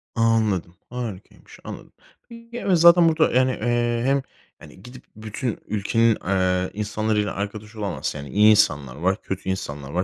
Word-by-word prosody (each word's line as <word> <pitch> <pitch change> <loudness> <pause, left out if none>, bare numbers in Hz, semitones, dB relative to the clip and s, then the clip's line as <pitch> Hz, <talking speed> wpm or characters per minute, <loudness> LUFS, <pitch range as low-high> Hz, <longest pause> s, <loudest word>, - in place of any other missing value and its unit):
Anladım, 110 -7 +1
harikaymış. 115 -6 -8
Anladım. - - -9 0.4
Ya, 230 0 -13
evet, 185 -3 +2
zaten 170 0 +7
burada, 160 0 +2
yani, 130 +1 +3
eee, 120 0 0
hem, 135 +1 +2 0.4
hani, 75 +5 -15
gidip 125 +2 -12
bütün 110 +2 -5
ülkenin, 110 +2 +1
eee, 95 -1 0
insanlarıyla 105 0 -1
arkadaş 105 +2 -6
olamazsın. 100 -7 -4
Yani, 70 - -8
iyi 105 +1 +5
insanlar 75 - +2
var, 95 +6 -1
kötü 95 0 -5
insanlar 70 -7 -5
var. 90 +3 0
105 Hz, 150 wpm, -23 LUFS, 95-120 Hz, 0.4 s, zaten